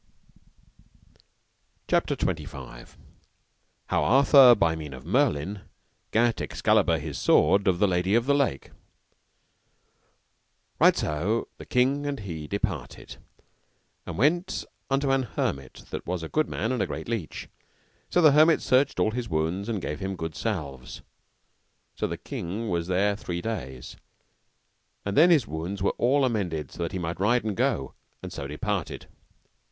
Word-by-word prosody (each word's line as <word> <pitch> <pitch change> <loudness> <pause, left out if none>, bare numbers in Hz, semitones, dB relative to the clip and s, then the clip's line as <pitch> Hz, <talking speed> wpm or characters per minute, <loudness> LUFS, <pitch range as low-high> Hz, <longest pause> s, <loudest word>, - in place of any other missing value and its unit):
CHAPTER - - +1
XXV. - - -5 0.9
How - - 0
Arthur 135 0 +7
by 85 -6 +2
the 80 - -4
mean 75 -4 -7
of 65 +2 -12
Merlin 100 - 0 0.5
gat 115 +1 +2
Excalibur 85 - +2
his 75 -1 -6
sword 100 0 +3
of 90 -2 +3
the 105 +2 +3
Lady 90 +2 +1
of 115 0 +2
the 140 - +3
Lake. 135 - 0 2.1
Right - - +5
so 90 +10 -1
the - - -10
king 135 +3 +1
and 140 -5 -3
he 80 -6 -6
departed, 95 -8 -4 0.9
and 85 - -5
went 165 - +1 0.2
unto 135 0 +1
an 135 0 +3
hermit 70 - -4
that - - -6
was 90 -1 -3
a 80 - -6
good 155 0 0
man 115 - -2
and 125 -4 -1
a - - 0
great - - -6
leech. 115 -9 -4 0.6
So 175 - +2
the 155 - +8
hermit 155 +3 +5
searched 130 +2 +2
all 110 - +2
his 120 +1 -4
wounds 85 +6 -1
and 110 -3 -1
gave 75 0 -4
him 95 0 -3
good 80 -2 -5
salves; 70 - -5 0.9
so - - -1
the - - -5
king 105 +7 -5
was 85 -2 -1
there 100 +3 +1
three 90 -4 -5
days, 65 - -6 1.1
and 100 - -2
then 165 +4 +7
were - - +7
his 145 -9 +3
wounds 90 +5 -4
well 130 +7 +2
amended 90 - -2
that 85 -2 -4
he - - -4
might 85 -1 -4
ride 120 +5 +2
and 110 -2 -2
go, 120 - 0 0.3
and - - -7
so 70 - -5
departed. 95 +6 -3
100 Hz, 150 wpm, -26 LUFS, 80-125 Hz, 2.1 s, the